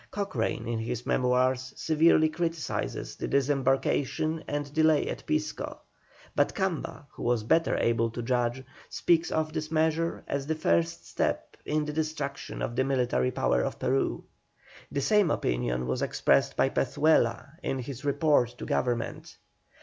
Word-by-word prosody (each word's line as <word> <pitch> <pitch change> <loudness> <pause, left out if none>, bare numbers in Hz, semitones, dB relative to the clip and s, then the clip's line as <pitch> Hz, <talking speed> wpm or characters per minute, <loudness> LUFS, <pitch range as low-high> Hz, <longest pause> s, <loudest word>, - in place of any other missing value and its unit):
Cochrane 195 - -2
in 115 -1 -1
his 120 +1 -4
Memoirs 130 0 +1
severely 160 0 +4
criticises 165 0 -3
the - - -3
disembarkation 140 +3 +1
and 145 -1 -3
delay 155 -1 +3
at - - -5
Pisco, 155 0 -2 0.6
but - - +2
Camba, 190 -7 -2
who - - -12
was 120 -2 +1
better 165 +9 +2
able 115 0 +2
to 120 +1 -5
judge, 125 +1 0 0.3
speaks 170 -1 +2
of 155 0 -1
this 155 -1 -3
measure 160 +1 0
as 140 0 -2
the 160 - 0
first 85 - 0
step - - -2
in 150 0 0
the 150 - -4
destruction 155 -3 -3
of 120 - -3
the 130 - +2
military 125 - +1
power 60 - +1
of - - -2
Peru. - - 0 0.7
The 140 - -1
same 205 +3 +3
opinion - - 0
was 65 - -2
expressed - - +2
by - - +3
Pezuela 140 -6 +2
in 135 - -2
his 130 +1 -6
report 140 -4 +2
to - - -6
Government. 120 -2 -2
140 Hz, 150 wpm, -28 LUFS, 120-155 Hz, 0.7 s, severely